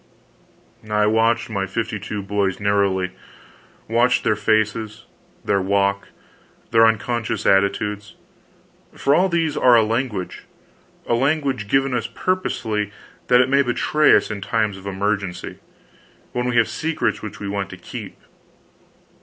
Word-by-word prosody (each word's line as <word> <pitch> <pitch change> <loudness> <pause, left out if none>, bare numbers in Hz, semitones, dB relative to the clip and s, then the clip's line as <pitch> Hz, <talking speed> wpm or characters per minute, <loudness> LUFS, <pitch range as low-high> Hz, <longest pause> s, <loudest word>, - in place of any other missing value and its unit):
I 105 0 +2
watched 115 +2 +2
my 100 -3 -2
fifty 110 +2 -3
two 105 0 -5
boys 100 -1 -1
narrowly; 100 -2 +1 0.8
watched 120 +3 +2
their 110 - +2
faces, 110 +1 -1 0.4
their 100 -1 +2
walk, 100 +1 0 0.6
their 115 -1 +6
unconscious 115 +1 -1
attitudes: 100 +1 +1 0.8
for 140 - +2
all 185 +5 +3
these 165 -3 0
are 125 -2 +5
a 115 - +5
language 110 -4 -3 0.6
a - - 0
language 135 -3 0
given 135 +3 +1
us 115 -2 -1
purposely 110 - -2 0.4
that 125 0 +6
it 130 - +2
may 140 +1 +3
betray 145 +4 +3
us - - +1
in 100 -1 -5
times 110 0 0
of 95 0 -10
emergency, 100 -1 -3 0.7
when 125 0 -2
we 120 - -2
have 115 - +4
secrets 160 0 -2
which 105 - -8
we 100 - -5
want 100 -1 -3
to 95 - -9
keep. 90 - -9
110 Hz, 135 wpm, -21 LUFS, 100-125 Hz, 0.8 s, their